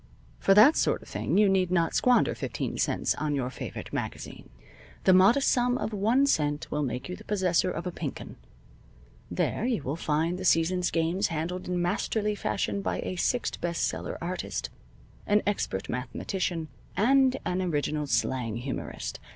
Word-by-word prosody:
For 195 Hz, -, +4 dB
that 245 Hz, +10 st, +8 dB
sort -, -, +1 dB
of -, -, -17 dB
thing -, -, -1 dB
you 210 Hz, 0 st, +6 dB
need 190 Hz, -2 st, +2 dB
not 170 Hz, -2 st, +1 dB
squander 250 Hz, -1 st, +3 dB
fifteen -, -, -4 dB
cents -, -, +1 dB
on 150 Hz, -1 st, -2 dB
your 130 Hz, -2 st, -2 dB
favorite -, -, -7 dB
magazine. -, -, -5 dB, 0.5 s
The 185 Hz, -, +6 dB
modest 200 Hz, +9 st, +5 dB
sum 245 Hz, 0 st, +2 dB
of 220 Hz, -, -3 dB
one 225 Hz, +7 st, +3 dB
cent 150 Hz, -, 0 dB
will 150 Hz, -, 0 dB
make 125 Hz, -3 st, -3 dB
you 180 Hz, -, -5 dB
the -, -, -13 dB
possessor 185 Hz, -3 st, +1 dB
of 170 Hz, -1 st, -4 dB
a 180 Hz, -, -2 dB
Pink 155 Hz, -5 st, -5 dB
'Un. -, -, -9 dB, 0.9 s
There -, -, -1 dB
you 230 Hz, -, -1 dB
will 140 Hz, +3 st, -2 dB
find 165 Hz, +2 st, -1 dB
the -, -, -5 dB
season's 180 Hz, +1 st, +2 dB
games 165 Hz, +3 st, +1 dB
handled 170 Hz, +3 st, -4 dB
in 180 Hz, 0 st, -1 dB
masterly 210 Hz, +4 st, 0 dB
fashion 200 Hz, -1 st, -2 dB
by -, -, -2 dB
a 185 Hz, -, -4 dB
six 240 Hz, +7 st, 0 dB
best 170 Hz, 0 st, -2 dB
seller -, -, -4 dB
artist, 180 Hz, +2 st, -4 dB, 0.6 s
an 210 Hz, +1 st, +3 dB
expert 150 Hz, -, -1 dB
mathematician, 160 Hz, +7 st, -3 dB, 0.3 s
and 265 Hz, +3 st, +4 dB
an 180 Hz, +1 st, 0 dB
original 150 Hz, -3 st, -1 dB
slang 115 Hz, -2 st, 0 dB
humorist. 125 Hz, +3 st, -5 dB
180 Hz, 170 wpm, -28 LUFS, 155-205 Hz, 0.9 s, that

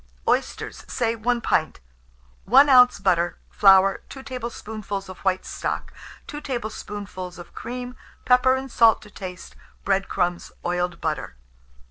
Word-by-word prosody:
Oysters, -, -, -1 dB
say 230 Hz, -1 st, 0 dB
1 235 Hz, +2 st, 0 dB
pint, 155 Hz, -, 0 dB, 0.7 s
1 270 Hz, +7 st, +6 dB
oz. 250 Hz, -1 st, +7 dB
butter, 175 Hz, -3 st, +1 dB
flour, 195 Hz, -1 st, +5 dB
2 270 Hz, -, -9 dB
tablespoonfuls 220 Hz, -6 st, -6 dB
of 185 Hz, -, -10 dB
white 190 Hz, -1 st, 0 dB
stock, -, -, -4 dB, 0.3 s
2 295 Hz, -, -7 dB
tablespoonfuls 205 Hz, -7 st, -6 dB
of 175 Hz, -, -12 dB
cream; 250 Hz, +1 st, -6 dB, 0.3 s
pepper 255 Hz, +1 st, +5 dB
and 265 Hz, 0 st, -5 dB
salt 230 Hz, -2 st, +5 dB
to 210 Hz, -, -15 dB
taste; 180 Hz, -3 st, -9 dB, 0.3 s
bread 195 Hz, 0 st, +1 dB
crumbs, 175 Hz, 0 st, -1 dB
oiled 175 Hz, 0 st, -1 dB
butter. 155 Hz, -, -3 dB
210 Hz, 130 wpm, -24 LUFS, 185-250 Hz, 0.7 s, oz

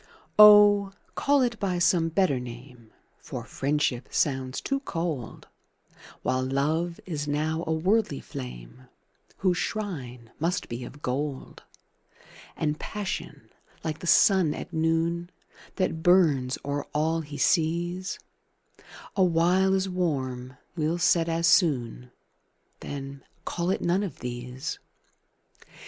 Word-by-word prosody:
Oh, 205 Hz, -1 st, +8 dB, 0.2 s
call 280 Hz, -1 st, +2 dB
it 235 Hz, -2 st, -1 dB
by 185 Hz, -3 st, -1 dB
some 170 Hz, -1 st, +3 dB
better 165 Hz, -6 st, +2 dB
name, 120 Hz, -1 st, -11 dB, 0.3 s
For -, -, -7 dB
Friendship 140 Hz, -3 st, -1 dB
sounds 130 Hz, -2 st, 0 dB
too 275 Hz, 0 st, -1 dB
cold, 165 Hz, -, -4 dB, 0.8 s
While 130 Hz, 0 st, +1 dB
Love 155 Hz, +6 st, -1 dB
is 150 Hz, -5 st, -4 dB
now 155 Hz, +3 st, -1 dB
a -, -, 0 dB
worldly 185 Hz, -, +1 dB
flame, 60 Hz, -, -9 dB, 0.5 s
Whose 185 Hz, -2 st, +1 dB
shrine 125 Hz, -, -5 dB
must 170 Hz, +3 st, -1 dB
be 120 Hz, +1 st, -5 dB
of 145 Hz, +4 st, -12 dB
gold: 135 Hz, +1 st, -3 dB, 1.0 s
And 150 Hz, -1 st, -1 dB
Passion, 205 Hz, -2 st, -5 dB, 0.3 s
like 160 Hz, -1 st, -3 dB
the 175 Hz, -, -7 dB
sun 190 Hz, -6 st, +5 dB
at -, -, -8 dB
noon, 165 Hz, +2 st, 0 dB, 0.5 s
That 185 Hz, -4 st, -1 dB
burns 155 Hz, -8 st, +3 dB
o'er 145 Hz, 0 st, -2 dB
all 160 Hz, +2 st, +1 dB
he 145 Hz, -2 st, -8 dB
sees, 175 Hz, +4 st, 0 dB, 1.0 s
Awhile 185 Hz, +1 st, +3 dB
as 190 Hz, 0 st, 0 dB
warm 130 Hz, -8 st, -2 dB, 0.2 s
will 160 Hz, +1 st, 0 dB
set 170 Hz, -1 st, +3 dB
as 165 Hz, +1 st, 0 dB
soon 130 Hz, -, +2 dB, 0.7 s
Then 140 Hz, -1 st, -7 dB, 0.2 s
call 175 Hz, 0 st, -2 dB
it 190 Hz, -, 0 dB
none 175 Hz, +3 st, +1 dB
of 200 Hz, -4 st, -4 dB
these. 125 Hz, +1 st, -5 dB
160 Hz, 120 wpm, -27 LUFS, 135-180 Hz, 1.0 s, Oh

